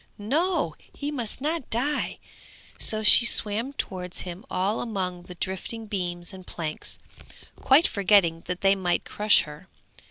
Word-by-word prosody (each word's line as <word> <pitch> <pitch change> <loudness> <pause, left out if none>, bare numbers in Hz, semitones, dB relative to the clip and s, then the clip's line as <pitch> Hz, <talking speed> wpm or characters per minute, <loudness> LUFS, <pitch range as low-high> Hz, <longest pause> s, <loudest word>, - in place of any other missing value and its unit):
No! 295 - 0
he 290 +1 -7
must 245 -4 -4
not 310 -1 -1
die; 280 +6 -1 0.6
so 215 0 +2
she 225 - +8
swam 225 +3 +2
towards 180 -9 -5
him 180 +2 -7
all 195 +4 0
among 185 -6 -3
the 180 - -10
drifting 190 +5 -4
beams 175 -3 -4
and 185 -1 -11
planks, 155 -3 -5 0.6
quite 280 +5 +5
forgetting 190 -5 +3
that 180 0 -4
they 195 0 +5
might 185 -3 -1
crush 210 0 +4
her. 150 +4 -11
200 Hz, 145 wpm, -26 LUFS, 180-235 Hz, 0.6 s, she